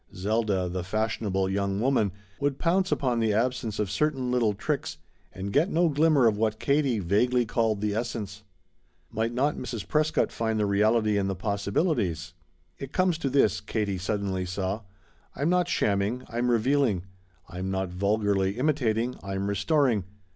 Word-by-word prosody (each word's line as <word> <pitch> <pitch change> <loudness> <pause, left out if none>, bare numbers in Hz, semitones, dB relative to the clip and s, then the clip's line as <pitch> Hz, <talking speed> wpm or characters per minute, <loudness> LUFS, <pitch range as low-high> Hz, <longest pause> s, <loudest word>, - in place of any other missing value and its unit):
Zelda, 100 -1 0
the 90 0 -3
fashionable 100 -1 -1
young 100 0 -1
woman, 115 -5 +2 0.3
would 140 -1 0
pounce 185 +4 +1
upon 125 -4 +1
the 110 -2 +2
absence 115 -1 -1
of 105 -3 -1
certain 135 +2 0
little 115 -4 +2
tricks - - -3 0.3
and 100 +1 -6
get 160 +7 +3
no 170 -1 +2
glimmer 150 -3 +3
of 110 -2 +3
what 110 -1 0
Katie 140 -4 +2
vaguely 120 +7 +2
called 110 -2 0
the 105 -1 0
essence. 105 -3 -4 0.7
Might 110 +2 -1
not 135 +5 0
Mrs. 120 -4 -5
Prescott 155 0 +1
find 110 -1 -1
the 105 - +2
reality 105 +1 +2
in 95 - 0
the 95 - -2
possibilities? 100 - -1 0.5
"It 135 -1 -7
comes 185 -3 +2
to 140 - -1
this," 120 -8 +2
Katie 105 -3 -2
suddenly 95 -1 -2
saw, 95 +3 -3 0.5
"I'm 145 +4 0
not 180 -1 +2
shamming, 105 - 0
I'm 120 +1 -1
revealing. 120 -4 +2 0.4
I'm 90 +2 -5
not 95 -1 -1
vulgarly 100 +1 0
imitating; 125 -4 0
I'm 100 0 -3
restoring. 105 - +1
110 Hz, 155 wpm, -27 LUFS, 100-130 Hz, 0.7 s, get